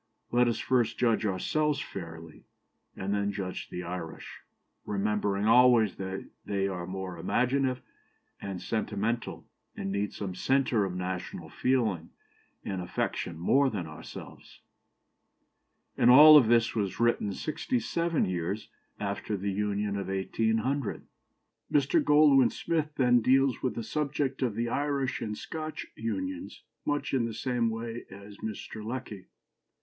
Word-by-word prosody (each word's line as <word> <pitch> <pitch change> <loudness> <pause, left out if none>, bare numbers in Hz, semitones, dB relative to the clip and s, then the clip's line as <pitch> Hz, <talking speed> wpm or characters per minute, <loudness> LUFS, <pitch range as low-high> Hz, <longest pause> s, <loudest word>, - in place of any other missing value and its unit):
Let 120 0 +4
us 115 - +1
first 120 -3 +1
judge 115 -3 +2
ourselves 145 +10 0
fairly, 80 - -8 0.5
and 95 +1 -2
then 100 0 0
judge 95 -2 -5
the 90 - -5
Irish, 85 -2 -7 0.4
remembering 105 0 0
always 115 -2 +5
that 95 0 -5 0.2
they 100 -1 -1
are 90 -3 -4
more 95 -2 -5
imaginative 125 +7 +1 0.6
and 95 -2 -5
sentimental, 110 +2 -2 0.3
and 95 - -4
need 100 +1 -1
some 95 -3 -5
centre 125 0 +2
of 90 -2 -4
national 90 0 -4
feeling 110 -11 0 0.6
and 95 -2 -3
affection 90 -1 -3
more 135 +11 +3
than 100 -8 -4
ourselves." 80 -1 -11 1.3
And 120 - +4
all 150 +3 +10
this 115 -1 +3
was 100 -4 -2
written 120 -3 +2
sixty 160 - -2
seven 170 -6 0
years 90 +3 -3 0.3
after 100 +1 -3
the 100 +1 -2
Union 100 0 -1
of 100 - -4
1800. 110 +6 -1 0.7
Mr. 140 -2 +3
Goldwin 145 -4 +6
Smith 155 -3 -2
then 125 -2 +4
deals 135 +2 +3
with 130 - -1
the 115 - -3
subject 145 -1 -2
of 120 -5 0
the 115 +1 -1
Irish 140 0 -1
and 105 -1 -3
Scotch 155 -1 -5
unions 280 - -4 0.2
much 145 -1 -1
in 125 -3 +2
the 115 -2 -4
same 120 0 0
way 115 +1 -5
as 100 +1 -12
Mr. 110 0 -6
Lecky. 110 -5 -6
110 Hz, 135 wpm, -29 LUFS, 100-130 Hz, 1.3 s, all